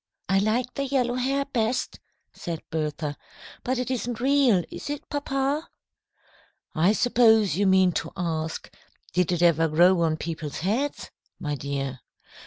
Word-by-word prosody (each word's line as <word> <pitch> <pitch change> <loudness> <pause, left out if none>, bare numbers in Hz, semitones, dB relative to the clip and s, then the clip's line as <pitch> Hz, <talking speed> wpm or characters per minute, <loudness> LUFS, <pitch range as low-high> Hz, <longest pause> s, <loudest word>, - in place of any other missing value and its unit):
"I 195 +1 +3
like 235 +5 0
the 280 - -2
yellow 255 -3 +1
hair 270 +3 0
best," 245 -1 -1 0.3
said 165 -2 -6
Bertha. 150 -1 -2 0.5
"But 255 +1 -1
it 250 +1 -2
isn't 245 -2 -3
real, 260 -7 +3
is - - -7
it, 290 0 -5
papa?" 285 +1 -1 1.0
"I 170 +5 +3
suppose 225 -3 +4
you 200 +2 +2
mean 190 -1 +5
to - - -3
ask, 160 -3 -3 0.4
'Did 180 -1 +1
it 175 -1 +1
ever 165 -1 +4
grow 175 +3 +4
on 160 -1 +1
people's 155 -3 -5
heads?' 235 - -2 0.3
my 150 -2 -3
dear. 135 -2 -4
200 Hz, 145 wpm, -25 LUFS, 165-255 Hz, 1.0 s, mean